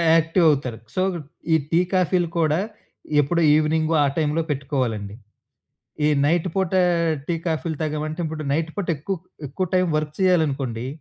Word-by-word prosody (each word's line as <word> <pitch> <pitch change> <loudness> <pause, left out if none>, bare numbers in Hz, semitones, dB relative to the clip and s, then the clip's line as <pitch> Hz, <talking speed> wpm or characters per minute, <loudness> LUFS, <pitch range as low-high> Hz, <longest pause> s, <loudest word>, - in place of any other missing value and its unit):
యాక్టివవుతారు. 155 -7 +2 0.2
So 185 - +1 0.5
ఈ - - +7 0.2
tea, 165 - +4
కాఫీలు 180 -1 +2
కూడా 155 +1 +2 0.6
ఎప్పుడో 170 +5 0
ఈవినింగ్ 155 +1 +1
ఆ - - +3
టై‌మ్‌లో 155 0 +1
పెట్టుకోవాలండి. 125 -8 -2 0.9
ఈ - - +4 0.2
నైట్ 170 +3 +1
పూట 190 -2 0 0.5
టీ, 170 - 0
కాఫీలు 160 0 -1
తాగామంటే 155 +2 -3
ఇప్పుడు 155 -1 -4
నైట్ 160 +2 0
పూట 200 -3 -2
ఎకుక్ 185 +4 -5 0.2
ఎక్కువ 185 +8 -2
టైం 185 0 +3
వర్క్ 155 -1 -2
చేయాలనుకోండి 140 - +1
155 Hz, 135 wpm, -23 LUFS, 145-170 Hz, 0.9 s, ఈ